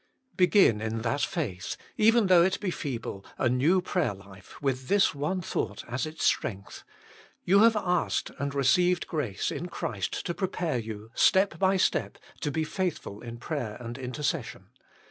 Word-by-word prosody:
Begin 180 - +4
in 110 0 -3
that 140 +5 0
faith, 100 - -3 0.2
even 225 +1 +4
though 180 -2 +6
it 185 +2 +2
be 195 -3 -2
feeble, 120 - -5
a 130 - +1
new 150 +10 +3
prayer 175 - 0
life, 95 -1 -14
with 130 -2 -2
this 200 -3 +3
one 155 +6 -2
thought 105 - -3
as 120 +4 -2
its 155 +1 -6
strength: 100 -3 -1 0.3
" - - -25
You 195 +3 +5
have 225 +1 +6
asked 180 -4 0
and 140 0 -3
received 175 +7 +3
grace 140 - -2
in 175 - -4
Christ 105 - -4
to 170 - -1
prepare 175 -7 -2
you, 110 -1 -7
step 190 -4 +3
by 190 0 +3
step, 185 - 0 0.2
to 150 - -2
be 160 +2 -1
faithful 165 - -3
in 120 -1 -7
prayer 120 -5 -4
and 120 -1 -6
intercession. 130 - -4
145 Hz, 165 wpm, -28 LUFS, 115-180 Hz, 0.3 s, though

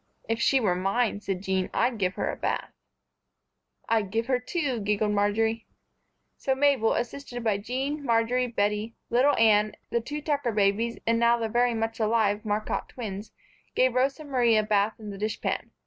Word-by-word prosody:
"If 225 0 -1
she 270 - +4
were 205 -7 +2
mine," 205 +4 0
said 195 -2 -3
Jean, 190 -1 0
"I'd 240 -2 +1
give 185 -1 0
her - - -1
a - - -6
bath." - - -2 1.2
"I'd 220 -4 +1
give 225 +3 -1
her 255 0 +1
two," 265 -2 -2
giggled 210 +1 0
Marjory. 220 +2 0 0.7
So 265 - 0
Mabel, 270 -5 +3
assisted 245 0 -4
by 210 -3 +1
Jean, 270 +7 -3
Marjory, 240 +1 +1
Bettie, 210 0 -1 0.2
little 260 +5 +4
Anne, 215 -1 +4 0.2
the 235 - +1
two 295 +6 -5
Tucker 285 -6 -1
babies 210 +3 +1
and 230 0 +2
the - - 0
now 235 -1 +3
very 240 +1 +2
much 225 0 -2
alive 215 -1 +1
Marcotte 215 0 -2
twins 210 -4 -6 0.4
gave 255 -1 +3
Rosa 270 +4 0
Marie 245 -6 +2
a 215 - +3
bath 210 0 +1
in 210 -2 -7
the 195 - -8
dish 215 +1 -2
pan. - - -2
225 Hz, 180 wpm, -27 LUFS, 210-245 Hz, 1.2 s, she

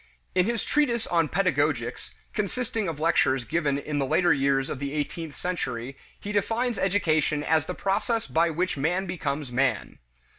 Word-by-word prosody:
In 180 +1 +3
his 235 -3 0
treatise 240 -7 +1
on 165 -2 +2
Pedagogics, 145 - 0 0.2
consisting 225 +1 -2
of 160 -3 -4
lectures 135 -5 +2
given 145 0 0
in 145 +1 -3
the 135 - +1
later 175 +4 +4
years 135 -1 +1
of 135 - -4
the 140 0 -3
eighteenth 150 +1 -3
century, 135 -8 -3 0.2
he 205 - -5
defines 225 +3 0
education 155 -6 +1
as 160 0 +2
the 180 - -3
process 225 +4 0
by 165 +1 +2
which 175 +1 -1
man 175 +7 0
becomes 150 -6 -3
man. 135 +2 0
165 Hz, 160 wpm, -26 LUFS, 140-195 Hz, 0.2 s, later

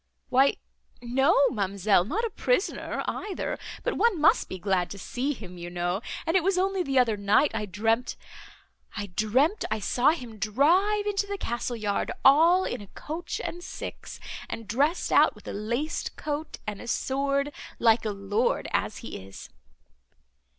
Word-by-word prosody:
"Why 270 +2 +4 0.4
no, 270 +4 +3
ma'amselle, 195 -3 +2
not 440 - -1
a 455 - -3
prisoner - - -1
either; 410 -3 -3 0.2
but - - -1
one 455 -7 +3
must 310 +2 +4
be 185 - -5
glad 185 -1 0
to 200 - -7
see 250 +8 -2
him, 180 -8 -10
you 175 0 -6
know. 175 +3 -2 0.2
And 325 - 0
it 370 - +4
was 380 0 +2
only 385 0 +1
the 275 -6 -1
other 240 -4 +4
night 205 +8 +3
I 210 -2 -2
dreamt—I 210 -1 -4
dreamt 260 - +2
I - - 0
saw 245 +6 +2
him 245 -9 -3
drive 355 - +3
into 405 -1 0
the 400 0 -3
castle 240 -4 -3
yard 210 -3 -1
all 330 +7 +6
in - - -3
a 200 - -10
coach 320 - -6
and 350 +1 -5
six, - - -7 0.3
and 225 -2 -6
dressed 285 +10 +1
out, - - +5
with - - -15
a - - -4
laced 235 +10 -3
coat 305 +1 -4
and 210 -1 -5
a - - -9
sword, 275 +3 0 0.2
like 225 -1 +4
a 220 - -1
lord 205 +3 0
as - - 0
he - - -7
is." 95 0 -11
250 Hz, 165 wpm, -27 LUFS, 210-325 Hz, 0.4 s, all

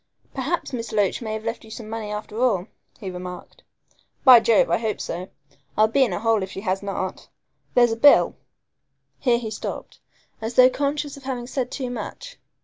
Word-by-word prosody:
"Perhaps 280 +3 -2
Miss 230 -2 -4
Loach 205 0 +1
may 220 -2 -4
have 220 0 -4
left 230 +1 -4
you 220 - -14
some 220 0 -8
money 220 -1 -5
after 210 +2 -5
all," 210 -8 +2 0.3
he 195 -5 -6
remarked. 180 0 -9 0.6
"By 255 -3 +10
Jove, 225 -1 +3
I - - +3
hope 220 -3 -2
so. 180 +3 -5 0.5
I'll 215 +1 +5
be 265 +5 +3
in 240 - 0
a 175 - -2
hole 225 -1 +2
if 190 - -4
she 190 - -7
has 190 -2 -1
not. 195 -2 -4 0.5
There's 240 -1 +5
a - - 0
bill 280 +5 +6 0.4
" - - -54 0.3
here 245 -3 +3
he 225 -2 -5
stopped, 215 - -6 0.4
as 225 +2 -4
though 255 0 +7
conscious 285 +1 -2
of 280 - -13
having 250 -3 -3
said 250 0 -3
too 255 -2 -4
much. - - -7
225 Hz, 200 wpm, -23 LUFS, 210-255 Hz, 0.6 s, By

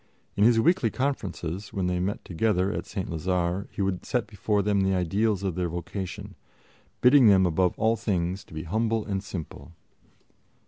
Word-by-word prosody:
In 100 - +2
his 115 0 +5
weekly 155 -2 +3
conferences, 100 - -3
when 95 -4 -2
they 90 0 0
met 95 +3 -3
together 95 +1 +1
at - - -4
St. 95 -4 -4
Lazare, 90 +3 -1
he 100 - -3
would 95 -2 -2
set 125 -4 -1
before 105 0 -1
them 100 -1 +2
the 95 0 +2
ideals 100 +3 0
of 95 -3 -1
their 90 0 -2
vocation, 85 +3 -6 0.7
bidding 125 -1 +7
them 95 -2 +6
above 90 +1 +1
all 110 +1 +2
things 95 -4 -2
to - - -16
be 80 - -4
humble 110 +5 0
and 100 -2 -3
simple. 85 -3 -8
95 Hz, 175 wpm, -26 LUFS, 90-110 Hz, 0.7 s, bidding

